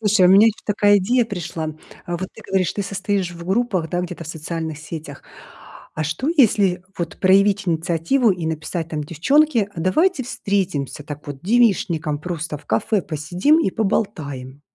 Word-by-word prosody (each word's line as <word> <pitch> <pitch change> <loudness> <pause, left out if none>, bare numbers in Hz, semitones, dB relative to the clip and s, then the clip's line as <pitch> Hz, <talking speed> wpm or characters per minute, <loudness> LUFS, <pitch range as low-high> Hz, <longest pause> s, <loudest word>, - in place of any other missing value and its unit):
Слушай, 210 -4 +4
у - - +6
меня 200 +3 +7
ещё 220 - -3
такая 205 -1 +4
идея 240 +6 +2
пришла, 175 -6 -5
м. 155 0 -7 0.3
А 175 - -4
вот 185 +2 -5
ты 220 - -12
говоришь, 190 -3 +1
ты 205 - -3
состоишь 195 -1 -2
в 170 -1 -10
группах, 190 -4 0
да, 175 - 0
где-то 175 -1 -6
в - - -9
социальных 160 -1 -5
сетях. 155 -2 -8 0.7
А 155 - -2
что, 155 - -2
если 200 - +3 0.2
вот 170 -2 -4
проявить 195 +1 +4
инициативу 170 +9 +1
и 175 -2 -5
написать 160 +1 -3
там: 155 -2 -3
"Девчонки, 235 - +2
а 165 - -5
давайте 280 - +2
встретимся 185 - -2
так 145 -1 -8
вот 135 -2 -7
девичником, 185 -9 +2
просто 160 -2 -4
в - - -22
кафе 180 - +1
посидим 175 - +1
и 260 - +1
поболтаем"? 145 - -2
180 Hz, 175 wpm, -21 LUFS, 160-205 Hz, 0.7 s, меня